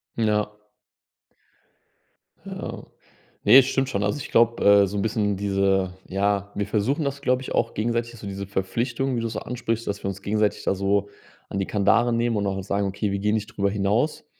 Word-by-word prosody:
Ja. 105 -2 +1 1.9
Ja. - - -6 0.6
Ne, 110 +6 +8
es 135 - +8
stimmt 135 -1 0
schon. 100 -4 -1
Also, 105 +8 -1
ich - - -7
glaube, 115 0 +3
äh, 100 -1 +6
so 100 +2 -4
'n - - 0
bisschen 105 -2 0
diese 95 -2 +1
ja, 100 +1 0
wir 100 0 -2
versuchen 115 +9 0
das, 140 0 -3
glaube 125 -2 +1
ich, 130 - -6
auch - - 0
gegenseitig 115 +1 -2
so 100 - -8
diese 100 0 -5
Verpflichtung, 120 +7 -1
wie 115 - -1
du 115 - -1
so 110 -1 -4
ansprichst, 115 -2 -3
dass 100 - -3
wir - - -2
uns 100 0 -6
gegenseitig 105 +1 0
da - - +1
so 100 +1 0 0.4
an 100 - -3
die 95 - 0
Kandare 115 +4 +2
nehmen 115 -1 +1
und 100 - 0
auch 95 0 -2
sagen: 100 +1 -1
„Okay, 100 +1 -2
wir 100 - -1
gehen 105 +2 +1
nicht 110 0 -3
darüber 100 -1 0
hinaus.“ 105 +11 0
105 Hz, 200 wpm, -24 LUFS, 100-115 Hz, 1.9 s, Ne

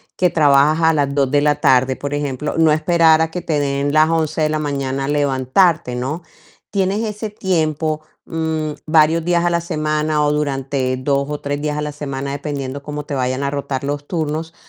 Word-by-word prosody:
que 180 -1 +2
trabajas 150 0 +4
a - - +3
las 140 -2 0
2:00 140 -2 +1
de 145 -1 +3
la 150 -1 +3
tarde, 130 -2 +3
por 140 0 -4
ejemplo, 145 0 -3
no 160 -1 +4
esperar 160 0 +4
a 160 - +1
que 180 - -4
te 150 -3 -1
den 140 0 0
las 155 +1 +4
11:00 160 -1 0
de 155 - +2
la 155 0 -1
mañana 135 -2 -2
levantarte, 145 +1 +2
¿no? 135 +8 -3 0.5
Tienes 195 +1 0
ese 210 0 -4
tiempo, 155 -5 -1 0.2
mm, 160 -2 -2
varios 160 +1 +3
días 175 -1 +2
a 175 - +2
la 170 0 +1
semana, 155 -2 -1
o 145 - +2
durante 135 -3 -1
2 140 +1 0
o 150 - -4
3 145 0 -3
días 150 0 -2
a - - -1
la 150 0 -3
semana, 140 -2 -5
dependiendo 140 -1 -5
cómo 150 0 -5
te 145 - -4
vayan 130 +1 -1
a 140 - 0
rotar 140 -1 -3
los 145 +1 -3
turnos, 160 -1 -3
150 Hz, 200 wpm, -19 LUFS, 140-160 Hz, 0.5 s, trabajas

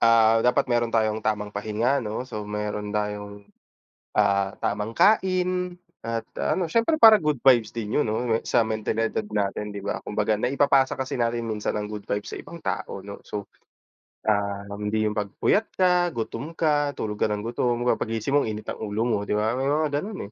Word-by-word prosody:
ah, 115 -1 +5
dapat 125 +4 +3
meron 120 -1 +2
tayong 110 -1 +1
tamang 105 -1 -2
pahinga 110 +7 0
'no. 110 +2 -4
So, 105 -4 -6
meron 105 0 -3
tayong, 105 -1 -4 0.7
ah, 100 -1 +2
tamang 105 +2 -2
kain 185 - +2 0.3
at 115 0 -1 0.2
ano 175 -3 0
siyempre 230 - +2
parang 220 -1 +9
good 150 -5 +1
vibes 120 -5 +4
din 110 -2 -2
yun 150 - +2
'no, 110 +1 0
sa 120 - +3
mentalidad 110 - -1
natin, 105 - -2
'di 100 - -6
ba? 100 - -4
Kumbaga 105 0 0
naipapasa 135 +2 +3
kasi 130 -1 -3
natin 115 -1 -1
minsan 105 -1 -2
ang 105 0 -3
good 105 -1 -7
vibes 105 0 -3
sa - - -6
ibang 170 -1 -10
tao 95 - -3
'no. 100 +1 -8
So, 105 -1 -6 0.7
ah, 100 -1 0 0.2
hindi 105 +1 0
yung 105 - +1
'pag 105 -1 -1 0.2
puyat 220 +2 +3
ka, 180 -1 +3
gutom 120 +7 -4
ka, 145 -3 +1
tulog 105 -1 -4
ka - - +3
ng 105 0 -3
gutom. 120 +1 -1
'Di 125 - -1
ba - - -1
paggising 115 +3 -2
mo, 145 -3 +3
init 105 0 -4
ang - - -7
ulo 110 +1 -2
mo, 120 -2 +1
'di - - 0
ba? 110 +1 +1
Oo, - - -3
may 135 - 0
mga 145 0 +1
ganun, 205 +2 -6
115 Hz, 195 wpm, -25 LUFS, 105-140 Hz, 0.7 s, parang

